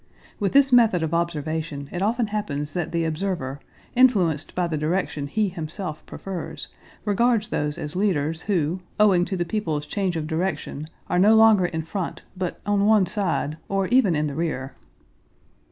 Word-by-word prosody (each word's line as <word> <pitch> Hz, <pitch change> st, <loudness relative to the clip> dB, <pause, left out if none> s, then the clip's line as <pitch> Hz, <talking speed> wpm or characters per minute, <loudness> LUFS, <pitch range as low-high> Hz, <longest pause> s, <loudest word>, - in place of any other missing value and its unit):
(With 200 Hz, -2 st, 0 dB
this 275 Hz, -1 st, +5 dB
method 225 Hz, -8 st, +5 dB
of 160 Hz, 0 st, -2 dB
observation 160 Hz, -3 st, -2 dB
it 180 Hz, -, -4 dB
often 230 Hz, +4 st, +1 dB
happens 150 Hz, -8 st, -3 dB
that 175 Hz, -2 st, -2 dB
the 170 Hz, -1 st, 0 dB
observer, 155 Hz, -5 st, -2 dB, 0.4 s
influenced 190 Hz, -, +3 dB
by 180 Hz, -, +1 dB
the 165 Hz, -2 st, -2 dB
direction 155 Hz, -2 st, -1 dB
he 210 Hz, +8 st, 0 dB
himself 165 Hz, -1 st, -6 dB
prefers, 190 Hz, -3 st, -6 dB, 0.4 s
regards 220 Hz, +1 st, +2 dB
those 150 Hz, 0 st, -1 dB
as 150 Hz, +2 st, -5 dB
leaders 165 Hz, -5 st, 0 dB
who, 175 Hz, -1 st, 0 dB, 0.2 s
owing 190 Hz, -4 st, +5 dB
to 190 Hz, -, -3 dB
the 175 Hz, -, 0 dB
people's 160 Hz, -7 st, -2 dB
change 190 Hz, +1 st, -1 dB
of 155 Hz, -, -2 dB
direction, 160 Hz, -2 st, -3 dB, 0.2 s
are 180 Hz, -, +1 dB
no 210 Hz, +4 st, +6 dB
longer 220 Hz, -5 st, +6 dB
in 160 Hz, -2 st, -3 dB
front, 165 Hz, -1 st, -4 dB
but 185 Hz, -2 st, -3 dB
on 205 Hz, 0 st, +2 dB
one 215 Hz, -3 st, +5 dB
side, 165 Hz, -7 st, -1 dB
or 195 Hz, -1 st, +1 dB
even 240 Hz, -9 st, +4 dB
in 150 Hz, 0 st, +1 dB
the 145 Hz, -, -3 dB
rear.) 140 Hz, -4 st, -3 dB
175 Hz, 170 wpm, -24 LUFS, 155-205 Hz, 0.4 s, no